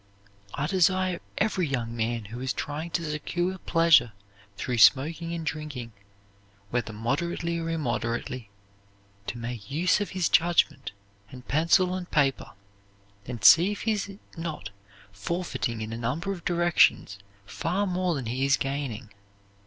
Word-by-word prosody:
I 145 - -1
desire 185 +1 +2 0.2
every 190 -5 +1
young 120 -4 -3
man 115 -1 -2
who 120 - -6
is 130 0 -1
trying 150 +3 -4
to 170 0 -2
secure 175 +5 -2
pleasure 165 -11 +4 0.4
through 125 -2 -2
smoking 160 +7 +4
and 165 -1 -4
drinking, 150 -7 -5 0.8
whether 120 -2 -1
moderately 170 +9 -2
or 165 0 -3
immoderately, 120 -5 -3 0.8
to 120 - -4
make 120 -1 -6
use 175 +8 +2
of 205 - -2
his 180 - +2
judgment, 170 -5 +2 0.4
and 125 +1 -12
pencil 165 +5 +3
and 185 -1 -5
paper, 135 -8 +1 0.7
and 120 -3 -6
see 175 +6 +8
if 205 - -8
he 225 - +1
is 200 -2 -3 0.2
not 160 - -5 0.4
forfeiting 115 - -3
in 110 +1 -5
a - - -4
number 140 +11 -2
of 180 -4 -7
directions 175 - +3 0.3
far 180 - -1
more 180 -2 0
than 135 -4 -4
he 125 +4 -2
is 140 0 +4
gaining." 135 -5 -4
150 Hz, 145 wpm, -27 LUFS, 120-175 Hz, 0.8 s, see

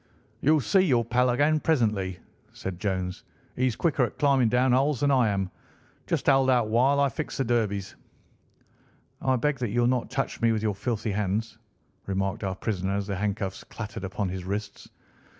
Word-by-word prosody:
"You'll 155 +1 +4
see 190 - +3
your 130 -11 +3
pal 125 +2 +2
again 145 +5 +3
presently," 105 - 0 0.4
said 95 -2 -6
Jones. 95 -2 -2 0.3
"He's 130 -2 +1
quicker 150 -3 +1
at 120 - -3
climbing 135 -5 +3
down 125 +2 +3
holes 135 +1 +2
than 145 -1 +3
I 130 -4 +4
am. 95 -2 -1 0.6
Just - - -1
hold 135 -1 +4
out 120 -4 +3
while 130 +5 +3
I 140 - +4
fix 150 +4 -5
the 135 - +1
derbies." 105 -5 -1 1.3
"I 130 -1 +2
beg 140 +3 0
that 120 -3 -1
you 120 +4 +1
will 120 - +3
not 125 -1 0
touch 135 +1 -3
me 115 0 +4
with 110 -1 -2
your 105 -2 +1
filthy 110 +1 -2
hands," 105 +2 -2 0.5
remarked 95 +2 -2
our 95 -1 -2
prisoner 95 -1 -2
as 100 0 -1
the 100 -1 -3
handcuffs 100 -1 -3
clattered 110 -3 -7
upon 95 +1 -2
his 95 0 -5
wrists. 100 +2 -5
115 Hz, 185 wpm, -27 LUFS, 100-130 Hz, 1.3 s, You'll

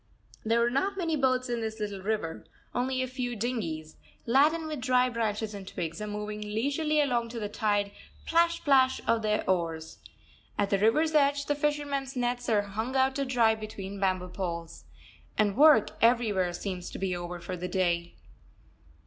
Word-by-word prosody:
There 230 +1 +2
are 240 - 0
not 390 +10 0
many 335 -4 0
boats 255 -2 +1
in 240 -1 -2
this 220 0 -4
little 205 -2 -4
river; 200 -5 -2 0.3
only 255 +1 0
a - - -2
few 250 -1 -3
dinghies, 180 -10 -3 0.3
laden 300 +7 +3
with 305 -4 -4
dry 255 0 +3
branches 220 -2 -2
and 195 -2 -8
twigs, 165 +1 -5
are 210 - -3
moving 210 0 -5
leisurely 280 +9 0
along 245 -5 +1
to 230 0 -5
the 210 - -2
tired 205 -1 0 0.3
plash! 335 +1 +2
plash! 265 -3 +4
of 230 -1 +2
their 215 0 0
oars. 165 -3 -1 0.6
At 200 -1 0
the 195 - +3
river's 305 +10 +3
edge 285 -1 +3
the 290 - +1
fishermen's 285 -2 -1
nets 245 0 -1
are 210 -2 +3
hung 220 +6 -4
out 265 0 +3
to 280 - 0
dry 235 -4 +3
between 200 -2 -7
bamboo 185 -2 0
poles. 170 -3 -5 0.5
And 205 -2 +2
work 295 -6 +6
everywhere 220 -6 +3
seems 180 -1 -5
to - - -7
be 190 -2 -1
over 175 0 -5
for 180 +2 -5
the 180 +1 -4
day. 175 -2 0
225 Hz, 175 wpm, -29 LUFS, 195-265 Hz, 0.6 s, work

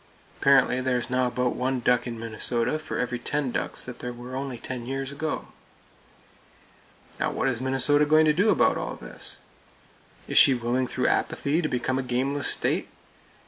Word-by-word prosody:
Apparently 135 -2 +4
there 130 -1 +1
is 125 +1 -5
now 125 0 +2
about 125 0 -1
one 130 +1 -1
duck 125 0 +2
in 115 -1 -5
Minnesota 115 +5 -1
for 155 - -5
every 125 -1 -2
ten 145 0 -1
ducks - - -1
that 125 - -8
were 120 0 -6
there 130 - -6
only 135 -2 -4
ten 120 0 -6
years 135 +1 -3
ago. 155 +2 -4 1.7
Now, - - +1
what - - -1
is 120 -2 -1
Minnesota 135 +3 +3
going 155 +1 +5
to 155 - +4
do 195 +8 +2
about - - +3
all - - -4
this? - - -5 0.9
Is - - +5
she 135 - +7
willing 120 +2 -1
through - - -2
Apathy 150 +5 +1
to 155 - -1
become 130 +1 -1
a - - 0
gameless 130 +3 -1
state? - - 0
130 Hz, 180 wpm, -26 LUFS, 125-140 Hz, 1.7 s, she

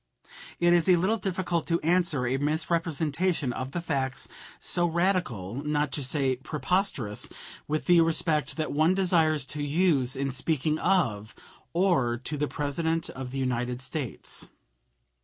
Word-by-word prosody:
It 175 0 +4
is 175 +1 +4
a 180 - +7
little 190 +6 +1
difficult 185 -3 -1
to 170 0 +2
answer 165 -6 +2
a 130 +2 +1
misrepresentation 160 0 0
of 130 +1 -4
the 170 +5 -3
facts 135 -5 -1 0.3
so 175 0 +1
radical 160 - -1
not 150 -1 0
to 145 0 -3
say 130 -1 0
preposterous 150 - -1 0.4
with 155 +1 -1
the 175 -2 +6
respect 165 -2 +1
that 155 -1 -2
one 160 +5 +3
desires 165 -6 +2
to 150 - -4
use 145 -4 +2
in 135 0 -1
speaking 155 +3 0
of 120 - +1 0.4
or 165 -10 +2
to 135 +5 -4
the 150 0 -1
President 160 +4 -1
of 130 -1 -6
the 135 - -5
United 125 -1 -1
States. 130 - -4
155 Hz, 145 wpm, -27 LUFS, 135-170 Hz, 0.4 s, a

